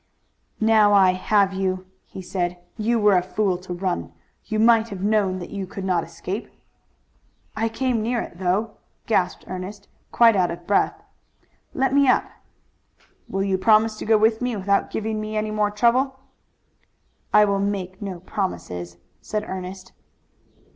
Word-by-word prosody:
"Now 220 -2 +5
I 190 -2 +6
have 195 +1 +2
you," 185 -1 -2 0.2
he 190 - -9
said. 180 -1 -2 0.2
"You 230 +2 0
were 210 -3 +4
a 180 - +4
fool 190 +1 0
to 185 0 -10
run. 175 - -2 0.3
You 220 - -3
might 225 0 +4
have 195 -3 -6
known 205 -3 +2
that 175 - -8
you 195 -2 -4
could 190 0 -6
not 180 -3 +1
escape." 180 +6 -6 1.1
"I 225 +1 0
came 240 0 -1
near 235 +2 0
it, 170 - -7
though," 195 +4 -1 0.3
gasped 185 -5 0
Ernest, 190 +3 -7 0.2
quite 230 -2 +5
out 185 -2 +2
of 170 0 -7
breath. 200 - +1 0.8
"Let 265 0 +1
me 280 -1 +4
up." 250 - +4 1.0
"Will 195 0 -1
you 190 -1 0
promise 215 +1 +4
to - - -6
go 220 0 +4
with 220 +1 +2
me 250 -2 -1
without 200 0 +1
giving 220 0 -3
me 215 0 -4
any 215 0 -1
more 210 -1 +1
trouble?" 250 +5 +1 1.1
"I 210 0 +6
will 200 -1 0
make 195 -1 -3
no 190 -4 -6
promises," 90 - -4 0.2
said 215 0 -3
Ernest. 185 0 -7
200 Hz, 160 wpm, -23 LUFS, 185-220 Hz, 1.1 s, I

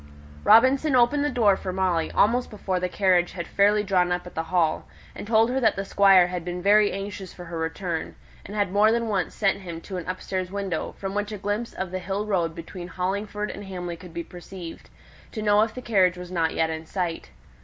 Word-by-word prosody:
Robinson 260 +5 +5
opened 255 +4 +4
the 295 - +1
door 215 -7 +3
for 190 - -5
Molly 180 -3 0
almost 240 +4 +2
before 190 -3 -2
the 180 0 -2
carriage 180 -2 +2
had 170 -3 -5
fairly 205 +1 +3
drawn 180 -3 +2
up 180 0 -1
at 180 - -10
the 160 - -3
Hall, 170 -4 +1 0.3
and - - -8
told 225 +1 +4
her 265 - 0
that 220 -5 +3
the 195 - -3
Squire 195 -2 +6
had 180 -1 -4
been 180 +1 -4
very 205 +2 +4
anxious 195 -1 -6
for 180 - -9
her 165 0 -6
return, 165 +1 -3 0.3
and 205 - -9
had 205 -3 0
more 210 +2 +4
than 230 0 0
once 195 -4 -1
sent 195 -2 +1
him 170 -4 -7
to 190 +1 -6
an 180 0 -6
upstairs 185 0 -3
window, 195 -4 -3
from 195 -1 -5
which 205 +1 -2
a 210 - -4
glimpse 205 +4 -3
of 190 -1 -4
the 185 - -3
hill 195 +3 -3
road 175 -6 0
between 175 +1 -8
Hollingford 200 +3 -3
and 205 - -8
Hamley 180 -2 -5
could 170 +1 -12
be 170 +1 -5
caught, 175 -1 -10 0.4
to 215 - -4
know 205 0 +4
if 220 0 0
the 255 - -7
carriage 185 -5 +3
was 180 0 -8
not 165 -3 0
yet 160 0 +1
in 160 0 -6
sight. 175 -3 -3
190 Hz, 225 wpm, -25 LUFS, 180-210 Hz, 0.4 s, Squire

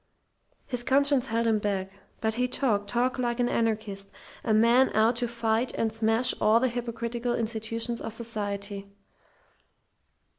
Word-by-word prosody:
His 245 -2 -2
conscience 275 +1 +3
held 230 +1 0
him 220 -2 +2
back. 195 -2 -2 0.3
But 220 0 0
he 250 +2 0
talked 220 -6 0
talked 245 +3 0
like 240 -1 -1
an 245 - +2
anarchist, 215 -4 -2 0.3
a 225 - -1
man 235 +4 +5
out 225 +2 +3
to 240 0 0
fight 230 +1 0
and 225 -1 -1
smash 225 +3 +3
all 215 +2 +5
the 255 +1 +1
hypocritical 240 0 -3
institutions 230 +1 -3
of 225 - -5
society. 205 -3 -4
230 Hz, 145 wpm, -27 LUFS, 220-240 Hz, 0.3 s, man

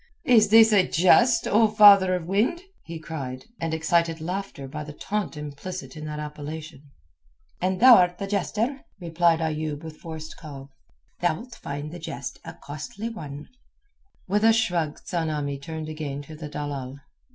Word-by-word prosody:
"Is 235 -7 +5
this 225 0 +7
a 190 -3 +4
jest, 230 +7 +4
O 220 +2 +4
father 200 -3 +7
of 175 -3 -4
wind?" 215 - 0 0.2
he 165 0 -7
cried, 140 -6 -6
and 165 -1 -2
excited 165 +1 +1
laughter 180 -4 -5
by 150 +3 -6
the 150 0 -9
taunt 205 +1 -3
implicit 150 +6 -7
in 155 0 -7
that 150 0 -5
appellation. 150 0 -8 0.7
"And 185 +1 0
thou'rt 185 -8 +7
the 200 - -4
jester," 215 +7 -2 0.2
replied 170 -1 +2
Ayoub 155 -1 -3
with 160 -1 -9
forced 160 -1 -8
calm, 140 -3 -10 0.5
"thou'lt 175 +9 -2
find 145 +2 -6
the 175 - -8
jest 140 -5 -6
a - - -9
costly 150 +10 -7
one." 150 -10 -8 0.8
With 205 +3 +1
a 225 0 +6
shrug 175 -9 0
Tsamanni 150 -5 -2
turned 160 0 -6
again 150 -2 -5
to 155 +2 -11
the 150 -1 -8
dalal. 140 -3 -5
160 Hz, 155 wpm, -25 LUFS, 150-195 Hz, 0.8 s, this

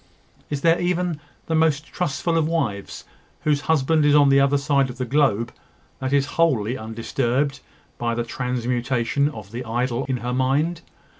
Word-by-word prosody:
Is 145 -2 -3
there 165 +2 +3
even 175 -2 0 0.3
the 165 - -2
most 160 -2 +2
trustful 165 0 -2
of 160 -2 +2
wives, 130 -12 -2 0.4
whose 150 -2 +1
husband 155 0 +3
is 145 0 +4
on 145 -1 +6
the 135 0 +5
other 140 +1 +3
side 140 -1 +1
of 125 - -8
the 130 - -2
globe, 120 -4 +1 0.5
that 130 0 -3
is 140 -1 +3 0.2
wholly 125 -8 +2
undisturbed 120 +5 -1 0.4
by 120 -1 -1
the 120 - -1
transmutation 125 +2 -1
of 110 -8 -10
the 120 +2 -5
idol 120 +2 -1
in 130 -1 -1
her 125 - -1
mind? 145 +6 +1
135 Hz, 165 wpm, -23 LUFS, 120-150 Hz, 0.5 s, on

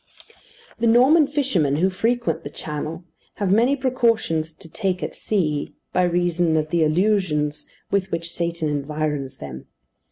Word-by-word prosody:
The 230 - +2
Norman 270 +7 +6
fishermen, 250 - +1
who 185 +5 +2
frequent 200 -4 0
the - - -6
Channel, 155 +3 -5 0.3
have 200 -3 -1
many 235 +7 +4
precautions 230 - +1
to 160 - -13
take 185 +1 -2
at - - -3
sea, 155 -9 -1 0.2
by 180 - +3
reason 175 -2 +1
of 155 0 -1
the 170 -2 +3
illusions 155 -3 +1 0.2
with 195 -1 0
which 170 0 -2
Satan 170 -2 -1
environs 145 -2 -2
them. 65 -2 -9
170 Hz, 140 wpm, -22 LUFS, 155-215 Hz, 0.3 s, Norman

